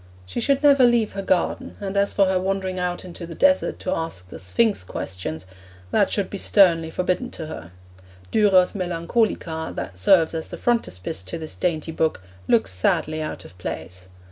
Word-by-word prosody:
She 90 - -4
should 275 +4 +1
never 280 -2 +6
leave 240 -3 +4
her 195 - -4
garden, 185 -2 -1
and 195 -1 -4
as 200 0 +2
for 200 - +3
her 185 -1 +1
wandering 190 -1 -2
out 180 0 -2
into 175 -1 -8
the 165 - -8
desert 280 0 +3
to 185 - -1
ask 130 - -4
the - - -9
Sphinx 210 - +1
questions, 90 -3 -5 0.5
that 200 - +3
should 200 -3 0
be 200 - -6
sternly 170 -6 +4
forbidden 180 +8 -1
to 165 - -6
her. 90 - -8 0.6
Durer's 195 -4 +4
Melancolia, 175 -2 -1
that 90 -2 -6
serves 165 - +4
as 160 -1 -3
the - - -7
frontispiece 95 - -1
to 95 0 -6
this 160 -1 -6
dainty 160 -3 -1
book, 160 -10 -1 0.2
looks 110 -5 +3
sadly 155 +12 0
out 155 - -5
of 85 - -14
place. 90 +2 -6
175 Hz, 180 wpm, -23 LUFS, 155-200 Hz, 0.6 s, never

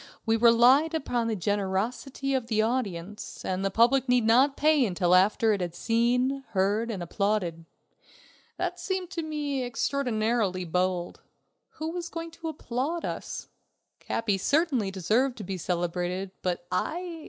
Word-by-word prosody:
We 225 - +3
relied 240 +7 +5
upon 245 -6 -1
the 225 - 0
generosity 205 - -2
of 255 -3 -1
the 220 -2 0
audience, 210 -5 -3
and 185 +1 -1
the 195 - +1
public 245 +5 +3
need 250 -2 +3
not 260 +5 +4
pay 305 -2 +4
until 180 -4 +1
after 210 +4 +4
it 200 - -2
had 175 -1 -3
seen, 250 +4 +1
heard, 205 +4 +1
and 195 -6 -3
applauded. 180 -3 -1 0.9
That 360 0 -2
seemed 370 0 -3
to 350 -3 -3
me 295 -3 -2
extraordinarily 230 -7 0
bold. 180 +1 -1 0.5
Who 315 +1 -4
was 345 0 -5
going 330 0 -6
to 330 0 -8
applaud 290 +3 -3
us? - - -5 0.5
Capi 205 -4 -1
certainly 280 - +1
deserved 220 +8 +1
to 215 - -6
be 190 -1 -4
celebrated, 180 +2 -2
but 175 -1 -2
I... 335 - -2
230 Hz, 145 wpm, -27 LUFS, 190-275 Hz, 0.9 s, relied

